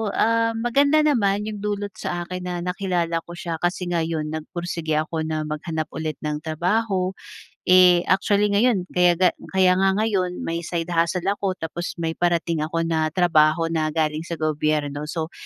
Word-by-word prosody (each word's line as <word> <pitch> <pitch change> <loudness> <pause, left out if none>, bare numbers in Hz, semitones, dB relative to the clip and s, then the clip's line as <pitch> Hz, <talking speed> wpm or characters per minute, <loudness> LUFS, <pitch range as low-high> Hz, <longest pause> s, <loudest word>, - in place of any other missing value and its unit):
ah, 230 0 +2
maganda 280 +7 +3
naman 210 -9 +2
iyong 210 -1 -5
dulot 205 0 -3
sa 175 0 -3
akin 180 +1 -6
na 180 - -3
nakilala 180 -2 -1
ko 170 +1 -11
siya 170 -2 -5
kasi 175 +2 -1
ngayon 160 -2 -1
nagpursige 160 0 -3
ako 155 +1 -1
na 155 -1 -2
maghanap 155 +1 -4
ulit 155 -1 -4
ng 150 0 -2
trabaho. 185 +4 0 0.5
Eh, 180 -1 +6
actually 200 +2 +2
ngayon, 205 -1 +3
kayaga 180 0 +4 0.2
kaya 185 -1 +5
nga 190 0 +3
ngayon 185 -5 -1
may 165 0 -2
side 170 0 -3
hustle 170 +1 +1
ako, 200 -2 -2
tapos 175 0 -5
may 165 -1 -2
parating 170 -1 0
ako 165 +2 -1
na 160 -1 +1
trabaho 165 -1 +3
na 155 -1 0
galing 155 -1 0
sa 170 - -3
gobyerno. 150 -2 -1
So, 160 0 -4
175 Hz, 165 wpm, -23 LUFS, 160-190 Hz, 0.5 s, Eh